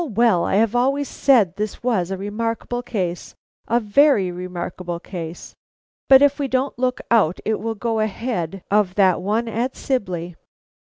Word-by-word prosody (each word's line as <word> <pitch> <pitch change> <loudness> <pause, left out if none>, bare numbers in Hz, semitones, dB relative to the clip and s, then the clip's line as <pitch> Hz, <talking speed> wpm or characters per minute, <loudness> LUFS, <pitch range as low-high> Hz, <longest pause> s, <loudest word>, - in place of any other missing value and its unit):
well! 225 -6 +3
I've 215 +2 +2
always 275 +3 +1
said 215 -10 +3
this 210 +1 -4
was 210 -8 0
a 195 - -3
remarkable 230 +4 -3
case, 185 -8 -4 0.3
a 235 +1 +2
very 215 -3 +3
remarkable 175 -1 -5
case; 170 -2 -8 0.6
but 265 +1 +8
if 285 +1 +3
we 280 - 0
don't 260 0 -1
look 255 0 0
out 200 -7 +3
it 220 - 0
will 225 +2 -3
go 225 +1 -2
ahead 200 -5 -3
of 200 -3 +2
that 190 -3 +3
one 215 +5 -1
at 235 +4 -2
Sibley. 180 -9 -3
215 Hz, 155 wpm, -21 LUFS, 185-245 Hz, 0.6 s, but